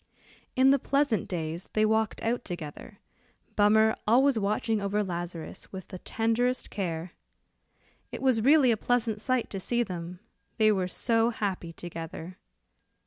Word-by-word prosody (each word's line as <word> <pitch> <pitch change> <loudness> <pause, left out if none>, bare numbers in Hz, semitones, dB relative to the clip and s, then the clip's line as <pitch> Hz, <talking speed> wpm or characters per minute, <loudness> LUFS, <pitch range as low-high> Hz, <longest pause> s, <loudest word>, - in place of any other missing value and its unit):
In 260 +1 +6
the 280 - +4
pleasant 275 -4 +1
days 165 0 -4
they 215 0 +3
walked 220 0 0
out 235 +2 0
together, 160 -5 -7 0.6
Bummer 220 +1 +4
always 255 +2 +4
watching 210 +1 0
over 200 +1 0
Lazarus 175 -3 -6
with 190 -1 -8
the 185 - -7
tenderest 235 +5 0
care. 170 -3 -3 1.0
It - - -6
was 255 -4 +3
really 275 0 +5
a 225 - +1
pleasant 230 -2 0
sight 255 0 0
to 195 - -3
see 240 +5 0
them, 175 -3 -6 0.4
they 215 -1 +5
were 190 -3 0
so 225 +4 +2
happy 195 -7 -3
together. 165 +1 -8
215 Hz, 140 wpm, -28 LUFS, 180-235 Hz, 1.0 s, In